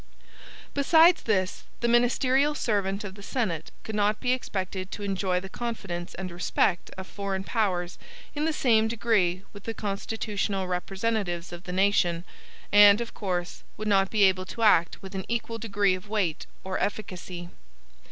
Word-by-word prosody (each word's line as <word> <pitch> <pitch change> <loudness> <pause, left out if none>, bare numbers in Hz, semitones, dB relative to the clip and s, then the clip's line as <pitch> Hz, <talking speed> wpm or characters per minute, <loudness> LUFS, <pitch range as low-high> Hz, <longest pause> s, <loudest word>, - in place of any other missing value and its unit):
Besides 325 +4 +5
this, 190 -4 0 0.2
the 235 - +2
ministerial 255 +4 +3
servant 200 -5 -1
of 195 -2 -6
the 200 - -12
Senate 200 - -2
could 220 - -6
not 210 0 +1
be 250 - 0
expected 190 -6 -3
to 205 - -6
enjoy 190 -2 0
the 195 - -8
confidence 190 -5 -5
and 185 -1 -5
respect 175 +1 0
of 190 - -6
foreign 195 -1 -4
powers 190 -5 -1 0.3
in 295 +1 -1
the 320 - +2
same 225 -7 +3
degree 200 -5 +1
with 205 -1 -12
the 225 - -4
constitutional 200 -1 -2
representatives 190 -1 -2
of 175 0 -9
the - - -5
nation, 180 -3 +2 0.5
and, 205 0 +8
of 235 -1 -5
course, 180 -3 -3 0.2
would 215 - -4
not 195 -2 +3
be 215 -2 +3
able 185 -1 +3
to 230 - -4
act 185 -4 +4
with 190 0 -9
an 190 -1 -3
equal 230 -1 -2
degree 205 -3 +1
of 185 +2 -6
weight 200 -7 -1 0.2
or 190 0 -3
efficacy. 185 -4 -4
200 Hz, 160 wpm, -27 LUFS, 185-225 Hz, 0.5 s, and